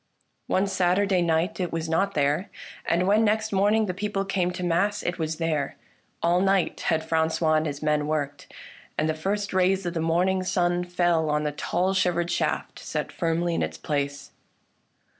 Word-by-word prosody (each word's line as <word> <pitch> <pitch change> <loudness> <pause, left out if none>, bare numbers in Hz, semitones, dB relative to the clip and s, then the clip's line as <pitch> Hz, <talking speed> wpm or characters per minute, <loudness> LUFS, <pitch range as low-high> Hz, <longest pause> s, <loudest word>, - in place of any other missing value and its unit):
One 190 - +2
Saturday 190 0 +2
night 170 +4 0
it 180 -2 -1
was 165 -1 -3
not 195 +5 0
there, 145 +7 +1 0.4
and 170 +2 +2
when 210 +3 +4
next 220 0 +1
morning 205 +3 +3
the 180 - -2
people 195 +1 -2
came 190 -2 0
to 180 0 -5
mass 195 +5 +1
it 175 +1 -2
was 160 0 -1
there. 155 -3 -1 0.5
All 175 +2 +3
night 195 -1 +1
had 160 -1 +1
Francois 160 0 +1
and 155 0 +2
his 145 0 -5
men 150 -1 +1
worked, 145 -2 -3 0.5
and 155 - +1
the 155 - +1
first 200 +6 -2
rays 185 +1 +2
of 175 - -2
the 165 - -2
morning 180 +3 +2
sun 180 -1 0
fell 175 -3 +1
on 150 0 +1
the 150 - -1
tall 180 +5 -1
shivered 175 -2 +1
shaft - - -2
set - - -4
firmly 170 0 0
in - - 0
its 80 0 -3
place. 140 -1 -3
175 Hz, 180 wpm, -25 LUFS, 160-190 Hz, 0.5 s, when